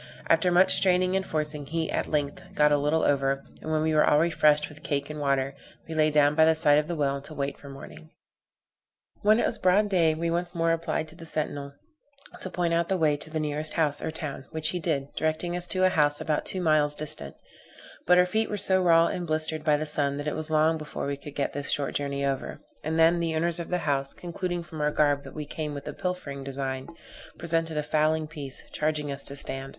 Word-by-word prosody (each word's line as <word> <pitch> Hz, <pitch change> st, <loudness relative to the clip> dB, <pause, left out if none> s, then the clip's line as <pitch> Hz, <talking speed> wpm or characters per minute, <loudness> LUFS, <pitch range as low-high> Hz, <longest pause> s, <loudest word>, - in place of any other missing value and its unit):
After 165 Hz, +2 st, +4 dB
much 185 Hz, +2 st, +5 dB
straining 185 Hz, 0 st, +3 dB
and 190 Hz, -, +1 dB
forcing, 150 Hz, -4 st, -3 dB
he, 160 Hz, +1 st, -2 dB
at -, -, -1 dB
length, 145 Hz, -2 st, -1 dB
got 150 Hz, 0 st, +4 dB
a 145 Hz, -, +4 dB
little 150 Hz, +3 st, +1 dB
over; 135 Hz, -1 st, +1 dB, 0.2 s
and 155 Hz, -, -5 dB
when 155 Hz, 0 st, +1 dB
we 160 Hz, 0 st, +1 dB
were 155 Hz, -, +5 dB
all 150 Hz, -, +4 dB
refreshed 150 Hz, -2 st, +3 dB
with 150 Hz, -1 st, -13 dB
the -, -, -8 dB
cake 145 Hz, +1 st, -2 dB
and 150 Hz, -, -6 dB
water, 140 Hz, -1 st, 0 dB, 0.3 s
we 165 Hz, -, -6 dB
lay 155 Hz, -1 st, +3 dB
down 145 Hz, -1 st, +4 dB
by 160 Hz, +1 st, +4 dB
the 160 Hz, 0 st, +5 dB
side 150 Hz, -2 st, +4 dB
of 150 Hz, -, -3 dB
the 170 Hz, -, -3 dB
well 140 Hz, -2 st, -1 dB
to 155 Hz, +2 st, -11 dB
wait 140 Hz, 0 st, -2 dB
for 140 Hz, -, -13 dB
morning. 75 Hz, -, -11 dB, 1.1 s
When 215 Hz, +1 st, +5 dB
it -, -, +2 dB
was 220 Hz, -, -1 dB
broad 200 Hz, +2 st, +3 dB
day, 165 Hz, -5 st, +3 dB
we 165 Hz, +1 st, -2 dB
once 175 Hz, +1 st, -2 dB
more 165 Hz, 0 st, +2 dB
applied 165 Hz, -1 st, -1 dB
to 160 Hz, -, -12 dB
the 165 Hz, -1 st, -10 dB
sentinel, 145 Hz, -3 st, -3 dB, 0.7 s
to 185 Hz, -, -4 dB
point 175 Hz, -2 st, -1 dB
out 170 Hz, 0 st, +1 dB
the 190 Hz, -, +1 dB
way 155 Hz, -3 st, +2 dB
to 155 Hz, -, -7 dB
the 155 Hz, 0 st, -3 dB
nearest 150 Hz, 0 st, -2 dB
house 150 Hz, -3 st, 0 dB
or -, -, -2 dB
town, 150 Hz, -4 st, -6 dB
which 160 Hz, -1 st, 0 dB
he 180 Hz, -, -2 dB
did, 145 Hz, -4 st, -2 dB
directing 160 Hz, +2 st, -1 dB
us 180 Hz, 0 st, 0 dB
to 185 Hz, +1 st, +1 dB
a -, -, +5 dB
house 145 Hz, -4 st, +2 dB
about 155 Hz, -1 st, -1 dB
two 185 Hz, -, -1 dB
miles 155 Hz, -3 st, +2 dB
distant; 150 Hz, -, -4 dB, 0.7 s
but 180 Hz, +1 st, +6 dB
our 180 Hz, -, +6 dB
feet 220 Hz, +5 st, -1 dB
were 210 Hz, -, -2 dB
so 190 Hz, -1 st, +5 dB
raw 165 Hz, -2 st, +5 dB
and 175 Hz, 0 st, -3 dB
blistered 155 Hz, 0 st, -1 dB
by 150 Hz, -1 st, +3 dB
the 155 Hz, -, -3 dB
sun 145 Hz, -2 st, 0 dB
that 145 Hz, -, -4 dB
it 150 Hz, -, -1 dB
was 155 Hz, 0 st, -2 dB
long 160 Hz, +1 st, +2 dB
before 150 Hz, -1 st, -5 dB
we 140 Hz, 0 st, -2 dB
could 140 Hz, +1 st, -11 dB
get 140 Hz, -, -1 dB
this 145 Hz, 0 st, -4 dB
short 140 Hz, -1 st, -1 dB
journey 140 Hz, -1 st, -2 dB
over; 135 Hz, -1 st, -2 dB, 0.3 s
and 160 Hz, +1 st, -2 dB
then, 165 Hz, +1 st, +5 dB
the 165 Hz, -1 st, -1 dB
owners 170 Hz, +2 st, +1 dB
of 170 Hz, -, -5 dB
the 180 Hz, -, +1 dB
house, 140 Hz, -2 st, -1 dB
concluding 175 Hz, 0 st, -4 dB
from 160 Hz, -2 st, -8 dB
our 150 Hz, -, +2 dB
garb 145 Hz, -1 st, +2 dB
that -, -, -12 dB
we 150 Hz, -1 st, -5 dB
came 150 Hz, 0 st, -5 dB
with 140 Hz, -, -8 dB
a -, -, -4 dB
pilfering 180 Hz, -7 st, -4 dB
design, 135 Hz, -1 st, -4 dB, 0.5 s
presented 165 Hz, -1 st, -1 dB
a 150 Hz, -, 0 dB
fowling 155 Hz, +1 st, +1 dB
piece, 145 Hz, -3 st, -6 dB
charging 150 Hz, -1 st, -1 dB
us 140 Hz, 0 st, -3 dB
to 140 Hz, -, -1 dB
stand. 135 Hz, -1 st, -4 dB
155 Hz, 240 wpm, -27 LUFS, 145-165 Hz, 1.1 s, but